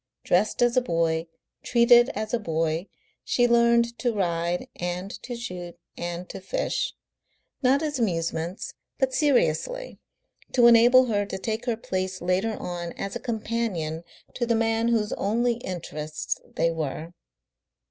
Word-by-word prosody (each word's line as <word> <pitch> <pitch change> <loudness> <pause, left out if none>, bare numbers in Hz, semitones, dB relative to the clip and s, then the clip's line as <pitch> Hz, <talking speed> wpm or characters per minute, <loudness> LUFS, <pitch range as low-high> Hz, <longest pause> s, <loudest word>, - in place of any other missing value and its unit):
Dressed 210 +7 +2
as 240 0 +3
a 255 - +5
boy, 165 -5 0 0.3
treated 240 0 +5
as 215 +2 -3
a 240 - +2
boy, 165 -1 -1 0.4
she 245 -1 +2
learned 235 0 +3
to 245 - +1
ride 175 -4 -1
and 180 +2 -3
to 245 - -6
shoot 180 -8 -7 0.2
and 175 +1 -5
to - - -7
fish - - -2 0.7
not 275 +3 +3
as 295 -4 -2
amusements, 170 -3 -2 0.2
but 265 -1 +1
seriously, - - +1 0.5
to 245 -2 +5
enable 240 +2 +7
her 205 -4 +1
to 190 - -4
take 220 +4 -3
her 235 -2 +1
place 185 -3 -3
later 185 +5 0
on 175 -1 -5
as 195 0 -5
a - - -2
companion 215 -9 -2 0.3
to 240 - -2
the 230 - +2
man 225 0 +1
whose 225 -3 +1
only 235 +3 +1
interests 155 -7 -4
they 165 0 +2
were. 160 +1 -4
215 Hz, 145 wpm, -26 LUFS, 175-240 Hz, 0.7 s, enable